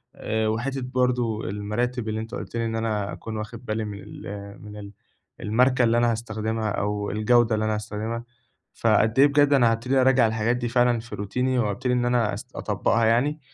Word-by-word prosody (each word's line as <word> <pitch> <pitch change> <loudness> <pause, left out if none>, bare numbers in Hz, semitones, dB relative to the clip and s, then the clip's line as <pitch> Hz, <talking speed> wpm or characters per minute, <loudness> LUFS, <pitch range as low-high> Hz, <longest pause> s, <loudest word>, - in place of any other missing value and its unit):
آآ، 110 0 -1
وحتة 130 +5 -2
برضه، 125 -3 0
المراتب 110 +3 -2
اللي 110 - -2
أنت 110 +1 -7
قُلت - - -7
لي 115 0 0
إن 115 0 -2
أنا 110 -3 -1
أكون 110 -1 -6
واخِد 110 +3 -7
بالي 110 -1 -2
من 100 -1 -6
ال 100 0 -9
من 105 0 -10
ال 100 -1 -9 0.5
الماركة 125 +4 +3
اللي 115 0 +3
أنا 120 0 +3
هاستخدمها 110 -1 -2
أو 105 0 -2
الجودة 115 +1 +3
اللي 110 0 -1
أنا 110 0 0
هاستخدمها. 110 +2 -4 0.5
فقد 110 +1 +2
إيه 140 - +8
بجد، 145 0 +3
أنا 120 -4 +5
هابتدي 125 +4 +1
أرجّع 130 -2 +4
الحاجات 110 +2 0
دي 120 -1 -2
فعلًا 120 -1 +3
في 120 +2 -8
روتيني، 125 +6 -1
وأبتدي 120 +4 0
إن 125 0 +1
أنا 120 -3 +1
أس - - -7
أطبِّقها 115 0 +1
يعني. 130 +7 +2
115 Hz, 190 wpm, -25 LUFS, 110-125 Hz, 0.5 s, إيه